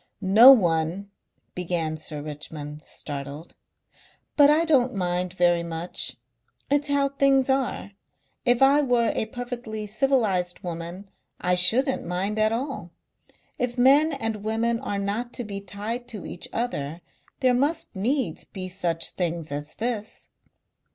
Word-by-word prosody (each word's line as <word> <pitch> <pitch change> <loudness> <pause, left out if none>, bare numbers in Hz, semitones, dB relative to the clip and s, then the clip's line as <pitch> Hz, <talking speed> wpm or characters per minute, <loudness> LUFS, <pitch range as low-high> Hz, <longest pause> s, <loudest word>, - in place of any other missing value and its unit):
"No 220 +8 +9
one 175 -3 +2 0.2
" - - -47
began 170 -3 -2
Sir 150 -1 -6
Richmond, 150 0 -8
startled. 145 +2 -7 0.8
"But 290 -1 +7
I 310 +3 +4
don't 260 -6 +3
mind 180 -1 -1
very 175 -1 +3
much. 170 +1 -2 0.5
It's 290 +1 +2
how 285 -1 +2
things 275 -1 +3
are. 265 -6 -1 0.5
If 245 0 +3
I 280 +2 +6
were 245 -4 +2
a 220 - -1
perfectly 240 -4 -6
civilized 210 -7 0
woman 175 +3 -7 0.3
I 180 - +1
shouldn't 225 +10 +3
mind 190 +5 -2
at 215 0 +3
all. 240 - -3 0.7
If 245 0 -2
men 285 +5 +5
and 225 -5 -2
women 225 +2 -1
are 220 -6 -3
not 210 +5 -3
to 245 - -4
be 200 -2 -6
tied 210 +5 -5
to 215 -5 -8
each 175 - -6
other 170 -9 -3 0.4
there 255 -1 +4
must 300 +3 0
needs 245 +6 -1
be 185 -2 -7
such 175 -3 -1
things 170 -4 -3
as 145 +1 -6
this." 225 -2 -4
210 Hz, 140 wpm, -25 LUFS, 175-250 Hz, 0.8 s, No